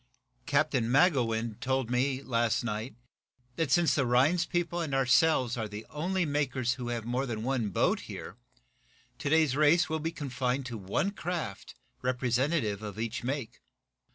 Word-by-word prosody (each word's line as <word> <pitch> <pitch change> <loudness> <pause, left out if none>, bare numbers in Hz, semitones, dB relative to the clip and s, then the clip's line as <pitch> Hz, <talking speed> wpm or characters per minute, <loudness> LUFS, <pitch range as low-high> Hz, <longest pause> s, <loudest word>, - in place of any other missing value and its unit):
"Captain 140 -5 +2
Magowan 120 - +2
told 130 -2 -1
me, 130 +2 0
last 115 -3 +1
night, 110 +1 -4 0.6
that, 165 -4 0
since 170 +4 +4
the 140 - +2
Rhinds 135 +8 +3
people 175 0 -1
and 150 -5 -2
ourselves 130 -1 +3
are 110 -2 -2
the 105 +1 -8
only 175 +5 -1
makers 135 -4 0
who 125 -1 -6
have 120 -2 -3
more 125 +3 -1
than 110 -2 -4
one 125 -4 0
boat 95 - +1
here, - - -8 0.8
today's 155 -2 +2
race 155 +3 +4
will 160 0 -1
be 160 +2 -2
confined 130 -3 -2
to 120 -2 -5
one 100 - -1
craft 170 - -5 0.3
representative 125 - 0
of 105 -2 -7
each 115 +3 -3
make. 130 -2 -4
130 Hz, 155 wpm, -30 LUFS, 120-155 Hz, 0.8 s, since